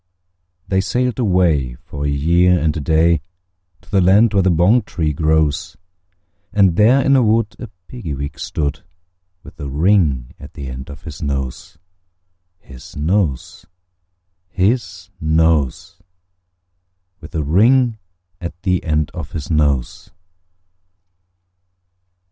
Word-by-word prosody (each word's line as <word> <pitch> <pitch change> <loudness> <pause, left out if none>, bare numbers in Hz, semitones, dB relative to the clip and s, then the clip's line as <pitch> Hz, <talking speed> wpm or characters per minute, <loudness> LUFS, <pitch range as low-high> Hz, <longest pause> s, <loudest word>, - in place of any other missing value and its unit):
They 95 -1 +1
sailed 125 +3 -1
away, 85 - +1
for 70 +3 -7
a - - 0
year 85 +6 +3
and 75 0 0
a - - -2
day, 80 +2 +2 0.6
To 90 - -22
the 100 -2 +3
land 100 +5 +4
where 100 - +3
the 95 - +2
bong 90 +8 +4
tree 80 -7 -2
grows; 80 +2 0 0.7
And 95 -5 +3
there 120 +7 +4
in 140 - +4
a 130 - +5
wood 110 -1 +1
a 120 - -7 0.2
Piggy 90 - -6
wig 70 +1 -6
stood, 75 -4 -3 0.6
With - - -15
a 70 -2 -5
ring 75 -5 +1
at - - -12
the 70 -2 -7
end 65 +2 -8
of 70 0 -11
his 80 -1 -9
nose, 70 0 -4 0.8
His 65 -7 -14
nose, 85 -1 -1 0.8
His 95 -1 -1
nose, 80 -3 0 1.2
With 80 +1 -12
a 80 - 0
ring 115 - +3 0.4
at 85 0 -7
the 90 -3 0
end 75 -2 -1
of 80 -3 -7
his 75 -1 -5
nose. 70 -5 0
85 Hz, 130 wpm, -18 LUFS, 75-95 Hz, 1.2 s, a